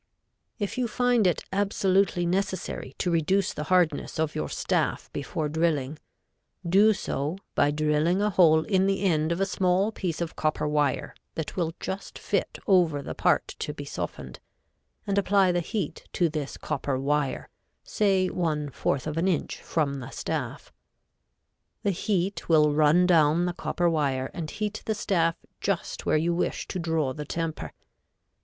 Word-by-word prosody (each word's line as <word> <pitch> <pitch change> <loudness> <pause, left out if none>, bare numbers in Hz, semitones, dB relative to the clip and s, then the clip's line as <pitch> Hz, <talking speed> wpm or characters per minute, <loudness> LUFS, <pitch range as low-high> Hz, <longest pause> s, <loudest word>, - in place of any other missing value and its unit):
If 205 +3 -3
you 250 - +1
find 245 -3 +2
it 175 - 0
absolutely 195 -2 +2
necessary 190 +2 -2
to 180 - 0
reduce 185 +4 +1
the 150 - -4
hardness 175 -3 +1
of 155 -1 0
your 75 - -3
staff - - -1
before 155 - -2
drilling, 155 -2 0 0.7
do 200 +5 +6
so 155 -3 -3 0.2
by 145 - +3
drilling 155 +4 +1
a 210 +1 +1
hole 160 -4 +5
in 190 +1 +2
the 195 0 0
end 160 -4 +2
of 170 - -1
a 195 - +2
small 190 +1 +1
piece 180 -6 -3
of 170 -2 -3
copper 155 -1 0
wire 150 -3 0 0.2
that 160 - -4
will 165 -2 -1
just 195 +1 -5
fit - - -2
over 170 -7 +3
the - - -5
part - - +2
to - - -4
be - - -7
softened, - - -6 0.7
and 200 0 +1
apply 195 -2 +3
the 175 - +1
heat 200 +5 -4
to 175 -2 +2
this 150 -2 -4
copper 140 -3 -2
wire, 140 0 0 0.4
say 195 -3 +2
one 155 -5 -1
fourth 130 +1 -1
of 155 0 -3
an 170 +3 +1
inch 180 -5 -1
from 140 -4 -1
the 125 0 -7
staff. - - -4 1.1
The 200 - +2
heat 190 0 -1
will 150 -2 +5
run 155 +4 +5
down 165 -1 +4
the 180 - -1
copper 175 0 -1
wire 140 -5 0
and 160 -3 -5
heat 215 +3 -3
the 220 - +1
staff 165 -5 +1 0.2
just 195 -3 -2
where - - +4
you 170 +3 +1
wish 170 - -2
to 185 - -3
draw 160 -5 0
the 150 - -5
temper. 165 +1 -4
170 Hz, 165 wpm, -27 LUFS, 150-190 Hz, 1.1 s, do